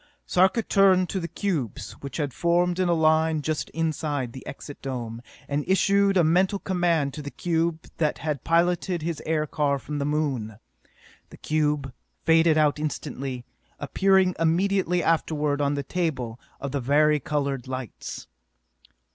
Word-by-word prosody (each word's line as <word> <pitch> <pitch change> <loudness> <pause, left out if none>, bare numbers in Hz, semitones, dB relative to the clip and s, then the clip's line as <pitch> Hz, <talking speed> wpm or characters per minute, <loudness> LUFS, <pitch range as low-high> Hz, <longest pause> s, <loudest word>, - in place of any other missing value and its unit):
Sarka 190 +5 +3
turned 190 -3 +4
to 190 - -2
the 170 - -4
cubes, 165 - -3
which 140 - -6
had 145 -5 -2
formed 175 +1 +1
in 185 -1 +2
a - - +4
line 160 -1 +2
just 155 0 -2
inside 150 -6 -2
the 130 - -9
Exit 145 +1 -9
Dome, 120 -4 -5 0.3
and 145 +1 -1
issued 195 +1 +3
a 175 - +5
mental 185 +5 +3
command 175 -7 0
to 150 - -6
the 145 - -6
cube 165 0 -1
that 155 -2 0
had 150 -4 -3
piloted 175 0 +1
his 165 -2 -3
aircar 150 -2 0
from 145 +4 -5
the 140 - -1
Moon. 135 -8 -1 0.7
The - - -13
cube 150 -3 -1 0.3
faded 160 -1 +5
out 150 -1 +3
instantly, 135 -4 -4 0.3
appearing 190 -1 +3
immediately 180 +1 +2
afterward 150 -3 +1
on 145 0 +1
the 140 - -2
table 130 -8 -2 0.2
of 140 - -4
the 140 -1 -2
vari 150 +4 +3
colored 140 -2 -2
lights. 130 -3 -6
155 Hz, 150 wpm, -25 LUFS, 140-175 Hz, 0.7 s, a